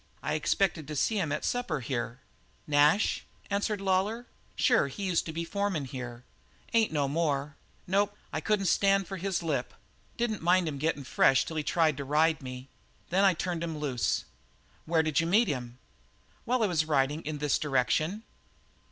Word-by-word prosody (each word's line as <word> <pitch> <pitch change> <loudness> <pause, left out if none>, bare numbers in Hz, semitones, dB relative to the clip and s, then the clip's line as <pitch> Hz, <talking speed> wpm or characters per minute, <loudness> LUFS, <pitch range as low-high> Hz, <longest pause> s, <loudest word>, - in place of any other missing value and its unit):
I - - -1
expected 175 -7 0
to 150 - -5
see 210 +9 +1
him 160 -6 -1
at 150 - -2
supper 245 - -1
here." 125 -1 -4 0.4
"Nash?" 150 +7 +3 0.3
answered 205 +1 0
Lawlor. 195 +5 0 0.3
"Sure, 240 - +3
he 140 +9 -7
used 180 -4 0
to - - -3
be 165 +1 -3
foreman 195 -5 -1
here. 125 -2 -7 0.5
Ain't 225 -2 +3
no 145 -3 +1
more. 145 -1 -1 0.3
Nope 205 +2 +1 0.2
I - - -1
couldn't 210 -2 +1
stand 195 +1 +3
for 195 - -5
his 185 -1 -2
lip. 140 -6 -2 0.4
Didn't 235 -3 -1
mind 175 +1 +3
him 145 -3 -4
getting 155 -1 -1
fresh 135 0 +3
till 160 - -5
he - - +1
tried 155 -2 +2
to 140 - -3
ride 155 +3 +2
me. 130 0 -8 0.4
Then 190 +3 +3
I 190 -3 +5
turned 170 0 -2
him 165 -2 -3
loose. 135 -5 -1 0.6
Where 160 -1 +3
did 155 -3 +1
you 165 - +1
meet 215 +7 +4
him?" 125 -3 -4 0.7
"While 250 -1 +1
I - - +5
was 165 -6 +1
riding 145 0 +1
in 155 -1 -4
this 145 -1 +1
direction." 155 - 0
160 Hz, 180 wpm, -29 LUFS, 140-195 Hz, 0.7 s, I